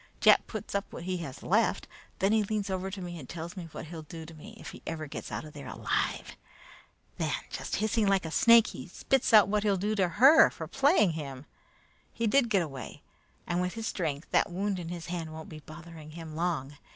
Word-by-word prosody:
Jack - - +6
puts 215 -1 -6
up 200 0 -2
what - - -7
he 185 +1 -2
has 140 -7 -7
left. - - +2 0.3
Then 195 +2 +2
he 220 0 +4
leans 205 -1 -2
over 190 0 -2
to 195 -1 -6
me 175 -1 -6
and 130 - -11
tells 170 0 -6
me 180 -3 -6
what - - -7
he'll 160 0 -7
do 160 +1 -9
to 165 - -11
me 210 +8 -12
if - - -8
he - - -12
ever 160 -1 -3
gets 140 - -7
out - - -4
of 150 - -11
there 140 -2 -9
alive. - - -2 0.8
Then, - - 0 0.2
just - - -3 0.2
like 195 -5 +3
a 160 - -4
snake 230 +4 +7
hissing, - - -6
he - - -9
spits 270 -2 0
out 215 -3 +8
what 210 +1 +1
he'll 205 -2 +2
do 205 +4 0
to 195 -4 +2
her 275 - +7
for 160 - -7
playing 270 - +3
him. 140 -4 -6 0.7
He 230 - -2
did 240 +2 +3
get 195 -5 +3
away, 135 -5 -8 0.4
and 175 0 0
with 180 +2 -2
his 225 -1 -4
strength, 155 -7 -3
that - - +3
wound 195 +1 -1
in 170 -2 -6
his 175 -1 -6
hand 170 -2 -4
won't 160 0 -8
be 155 - -9
bothering 155 0 -11
him 160 -1 -8
long. 155 -5 -2
175 Hz, 225 wpm, -29 LUFS, 160-205 Hz, 0.8 s, out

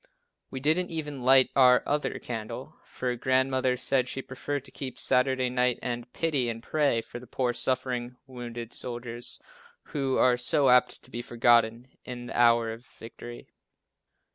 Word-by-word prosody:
We 130 - -5
didn't 160 +6 +2
even 150 -4 -4
light 130 +1 +6
"our 125 -2 +6
other 145 +1 -1
candle," 110 -3 -6
for 125 -1 -3
Grandmother 130 +1 +1
said 130 0 +1
she 135 +1 -4
preferred 140 +1 -5
to - - -10
keep 130 -2 -6
Saturday 130 0 +2
night 125 0 +1
and 120 -1 -4
pity 145 -7 0
and 115 0 -6
pray 145 -7 +1
for 120 - -9
the 125 - -13
poor 125 +1 -1
suffering, 125 -1 -2
wounded 120 -3 -7
soldiers, 120 -1 -5 0.5
who 135 -3 -2
are 125 -1 +4
so 135 +2 +2
apt 125 0 +3
to 125 - -14
be 120 - -4
forgotten 120 0 +2 0.2
in 120 -1 -7
the - - -7
hour 115 -1 +4
of 115 +2 -9
victory. 120 0 -11
125 Hz, 160 wpm, -28 LUFS, 120-130 Hz, 0.5 s, light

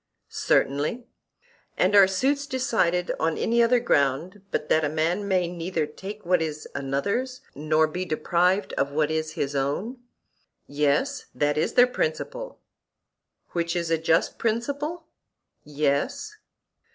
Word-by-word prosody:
Certainly. 150 - 0 0.7
And 190 +3 +3
are 200 -2 +8
suits 275 +9 0
decided 220 -10 0
on 160 0 0
any 235 +1 +2
other 235 +1 +4
ground 165 - 0
but 150 - -2
that 160 - +3
a 145 - +1
man 165 +6 0
may 185 -3 +2
neither 170 -1 -2
take 195 +7 -9
what 180 -1 +3
is 155 -1 -4
another's, 200 - -2
nor 155 +2 +2
be 175 +4 -4
deprived 180 +3 +1
of 140 0 0
what 150 +1 +1
is 155 0 -2
his 140 +1 -3
own? 150 - -2 0.7
Yes; 145 0 0
that 145 0 +1
is 155 - 0
their 245 - +8
principle. - - -3 0.9
Which 170 0 -1
is 170 -1 -1
a 165 - +3
just 165 +1 +1
principle? 285 +9 -2 0.6
Yes. 145 -1 -1
175 Hz, 135 wpm, -25 LUFS, 150-225 Hz, 0.9 s, are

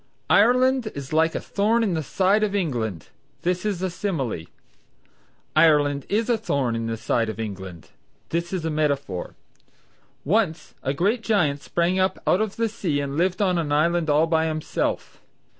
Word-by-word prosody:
"Ireland 250 +2 +4
is 140 0 -7
like 160 +1 +2
a - - 0
thorn 220 +3 +1
in 200 -5 0
the 160 - -1
side 190 +7 +2
of 205 -1 0
England;" 115 - -2 0.3
this 180 +3 0
is 185 -3 -2
simile. 135 - -3 1.1
"Ireland 145 -3 +4
is 220 +2 +1
a 235 -2 +1
thorn 135 - -1
in 115 0 -2
the 115 0 -3
side 115 0 0
of 110 - -6
England;" 95 -6 -7 0.4
this 170 +1 -2
is 185 -4 -2
metaphor. 145 - -2 0.9
"Once 175 -1 0
a 135 +1 -2
great 205 - +1
giant 165 -11 +1
sprang 175 +4 0
up 185 0 +1
out 185 - +3
of 215 -2 -2
the 230 0 0
sea 185 -10 -2
and 140 -1 -3
lived 185 +5 +1
on 180 -3 +2
an 155 -3 -2
island 165 +2 +2
all 150 +2 +4
by 160 -1 +1
himself. 155 -1 -3
165 Hz, 165 wpm, -24 LUFS, 140-200 Hz, 1.1 s, Ireland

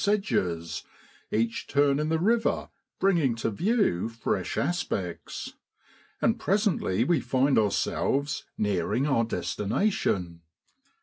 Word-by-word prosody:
sedges, 90 - 0 0.5
each 115 +1 -1
turn 140 0 +3
in 155 +1 0
the 160 - +2
river 225 +7 +1 0.3
bringing 170 -11 +3
to 115 0 -2
view 175 - +1
fresh 115 -5 -2
aspects; 105 - -3 0.7
and - - +2
presently 195 - +1
we 165 +3 +2
find 130 +3 +2
ourselves 135 +6 0
nearing 105 +5 0
our 135 -6 +2
destination. 100 - -1
135 Hz, 105 wpm, -27 LUFS, -, 0.7 s, turn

